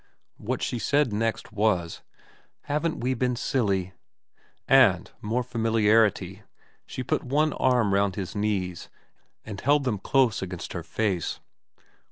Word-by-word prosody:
What - - -3
she 120 - -2
said 140 0 +1
next 115 +2 -2
was, 100 -6 0 0.3
* - - -33
Haven't 155 +2 -1
we 130 +2 0
been 125 0 0
silly/ 100 -7 -1 0.7
and, - - +5
more 115 +4 -1
familiarity, 110 -4 +2 0.5
she 130 - -5
put - - -1
one 150 +4 +1
arm 120 -6 +2
round 100 -1 +2
his 95 +1 -5
knees 100 -4 -2 0.6
and 100 -3 -7
held 145 0 +3
them 115 -7 -1
close 130 +1 +2
against 90 -2 -6
her 85 - -4
face. 90 +2 -2
110 Hz, 135 wpm, -26 LUFS, 100-125 Hz, 0.7 s, and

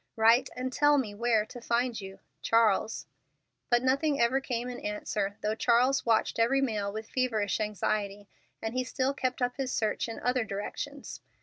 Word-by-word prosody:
Write 230 +3 +4
and 255 +1 -3
tell 290 +1 +4
me 225 -7 -1
where 220 0 +1
to 245 +2 -10
find 235 -1 0
you. 195 0 -9 0.2
CHARLES. 225 -1 +2 0.6
But 240 0 +3
nothing 275 +3 +1
ever 250 +3 +3
came 245 -2 -3
in 250 -1 -6
answer, 205 -1 -3
though 215 - 0
Charles 245 +4 +2
watched 225 0 +2
every 240 +4 +3
mail 215 -7 -1
with 220 +1 -6
feverish 225 -6 0
anxiety; 205 -1 -2 0.4
and 225 +1 -2
he 255 0 0
still 260 +2 -1
kept 255 -1 -2
up 245 +1 -1
his 265 -2 -2
search 215 +1 -1
in 225 - -6
other 250 -1 +1
directions. 225 +8 -6
235 Hz, 175 wpm, -29 LUFS, 215-255 Hz, 0.6 s, Write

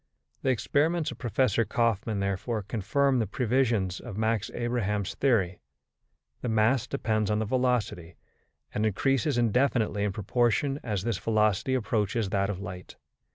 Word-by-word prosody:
The 135 - 0
experiments 150 +6 +1
of - - -10
Professor 120 -2 +1
Kaufmann, 110 -1 0
therefore, 100 +3 -2
confirm 125 +6 +1
the 110 - 0
previsions 115 -4 0
of 110 -5 -8
Max 110 -1 0
Abraham's 105 -5 -1
theory: 95 -10 +1 0.8
the 125 - -2
mass 110 +3 +2
depends 110 -6 -1
on 105 - +1
the 110 - 0
velocity, 120 -8 -1 0.6
and 105 - -1
increases 135 - +1
indefinitely 120 -3 +1
in 105 - 0
proportion 120 +7 0
as 105 -5 -2
this 115 -4 -1
velocity 110 +2 +1
approaches 110 -2 0
that 100 -1 0
of 100 -3 -3
light. 90 -2 -8
110 Hz, 140 wpm, -28 LUFS, 100-125 Hz, 0.8 s, mass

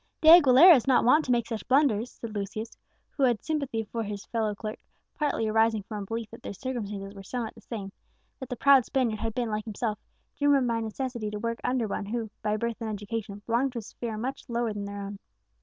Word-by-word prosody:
"De 315 - +5
Aguilera 330 +1 +9
is 250 - 0
not 255 -3 +4
wont 300 +6 +5
to 255 - -1
make 235 -2 +2
such 230 -2 -5
blunders," 255 -4 +3
said 230 -2 -8
Lucius, 215 +2 -5 0.4
who 285 - -6
had 245 -5 +3
sympathy 280 -8 -2
for 230 +2 -4
his 205 -2 -5
fellow 220 -3 -1
clerk, 215 +1 -6 0.3
partly 285 -7 -1
arising 220 -1 +2
from 210 0 -6
a - - -5
belief 225 0 -4
that 230 - -11
their - - -6
circumstances 205 -5 -5
were 195 - -10
somewhat 225 +3 -4
the - - -16
same 200 -4 -6 0.5
that 260 - -7
the 250 - -3
proud 275 +1 +6
Spaniard 235 -4 0
had 225 0 -3
been, 240 -3 -1
like 210 0 -2
himself, 215 0 -3 0.4
driven 285 -2 +3
by 230 -1 0
necessity 225 0 -3
to 210 - -5
work 230 +2 -3
under 250 -3 0
one 200 0 -4
who, 225 -1 -3
by 210 0 0
birth 235 +1 -3
and 225 - -3
education, 205 -1 -5
belonged 245 +3 +1
to - - -5
a - - -2
sphere 225 +1 -6
much 260 +4 -5
lower 235 -2 -1
than 205 -1 -5
their 200 0 -6
own. 200 0 -7
230 Hz, 225 wpm, -28 LUFS, 210-250 Hz, 0.5 s, Aguilera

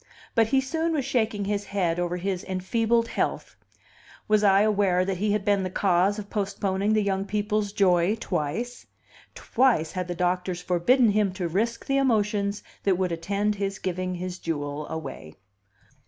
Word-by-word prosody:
But 225 -1 +3
he 265 +2 +3
soon 320 +5 -1
was 285 -5 -1
shaking 220 -5 0
his 205 0 -2
head 175 -4 -1
over 175 0 -1
his 185 0 -2
enfeebled 225 +5 0
health. - - -2 0.7
Was 215 0 +3
I 195 -1 +5
aware 195 -4 +2
that 190 -1 -2
he 205 +3 0
had 210 -2 -1
been 205 -2 +3
the 185 - -2
cause 190 +2 +2
of 210 -1 -6
postponing 200 0 -1
the 215 -1 +2
young 195 -1 0
people's 210 0 -1
joy 185 -1 +3
twice? 210 +6 -3 0.5
Twice 235 -11 +1
had 185 -2 -3
the 175 - -4
doctors 180 0 -1
forbidden 205 +7 +3
him 205 -2 +2
to 180 -2 -3
risk 220 +7 -1
the 275 - +1
emotions 210 -5 +1 0.2
that 190 -3 +2
would 185 -1 0
attend 200 +5 -1
his 195 -1 -3
giving 185 0 -3
his 180 0 -5
jewel 145 -2 -4
away. 135 - -7
200 Hz, 170 wpm, -26 LUFS, 180-215 Hz, 0.7 s, I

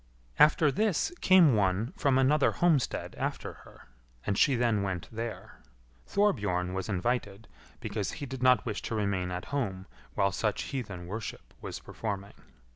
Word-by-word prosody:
After 150 0 +6
this 215 - +1
came 180 -7 +6
one 100 +3 +1
from 135 -2 +2
another 135 +2 +3
homestead 165 -7 +1
after - - -3
her, - - -16 0.4
and 100 - 0
she 135 +6 +4
then 115 -4 +2
went 95 -4 -3
there. 115 0 -6 0.5
Thorbjorn 105 - +1
was 95 +2 -3
invited, 105 0 -2 0.3
because 100 -6 -3
he 145 - -5
did 130 -1 -7
not 130 -1 +4
wish 110 -3 -3
to 115 - -4
remain 100 -4 -1
at 90 0 -4
home 95 -9 -2 0.3
while 100 0 +2
such 105 +1 -1
heathen 100 -10 -5
worship 105 +4 -7
was - - -5
performing. 100 -2 -5
110 Hz, 150 wpm, -29 LUFS, 95-135 Hz, 0.5 s, After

